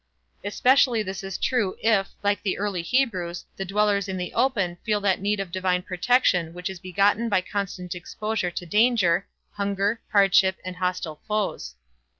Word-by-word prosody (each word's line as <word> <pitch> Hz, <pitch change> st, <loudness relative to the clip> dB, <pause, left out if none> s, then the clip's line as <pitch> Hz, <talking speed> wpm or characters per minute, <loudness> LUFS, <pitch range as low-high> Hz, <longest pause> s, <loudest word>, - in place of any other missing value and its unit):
Especially 245 Hz, +3 st, +3 dB
is 195 Hz, -2 st, -5 dB
this 195 Hz, -1 st, -5 dB
true 230 Hz, -8 st, 0 dB
if, 215 Hz, -3 st, +2 dB
like 205 Hz, -1 st, +1 dB
the 195 Hz, -, -1 dB
early 200 Hz, -3 st, -2 dB
Hebrews, 180 Hz, -5 st, -1 dB
the 195 Hz, -, -4 dB
dwellers 200 Hz, 0 st, +1 dB
in 190 Hz, -1 st, -3 dB
the 180 Hz, -1 st, -4 dB
open 215 Hz, -8 st, +1 dB
feel 210 Hz, -2 st, +1 dB
that 195 Hz, -2 st, +1 dB
need 205 Hz, +1 st, 0 dB
of 195 Hz, -3 st, -4 dB
divine 185 Hz, 0 st, 0 dB
protection 180 Hz, -3 st, +1 dB
which 180 Hz, +1 st, -4 dB
is 190 Hz, -, -9 dB
begotten 200 Hz, +5 st, +1 dB
by 200 Hz, -3 st, +2 dB
constant 185 Hz, -2 st, -4 dB
exposure 205 Hz, +2 st, -3 dB
to 175 Hz, 0 st, -6 dB
danger, 205 Hz, -3 st, +3 dB, 0.2 s
hunger, 200 Hz, +2 st, -1 dB
hardship 195 Hz, -2 st, +4 dB
and 185 Hz, 0 st, -6 dB
hostile 180 Hz, -4 st, -3 dB
foes. 200 Hz, -, -2 dB
195 Hz, 160 wpm, -25 LUFS, 180-210 Hz, 0.2 s, hardship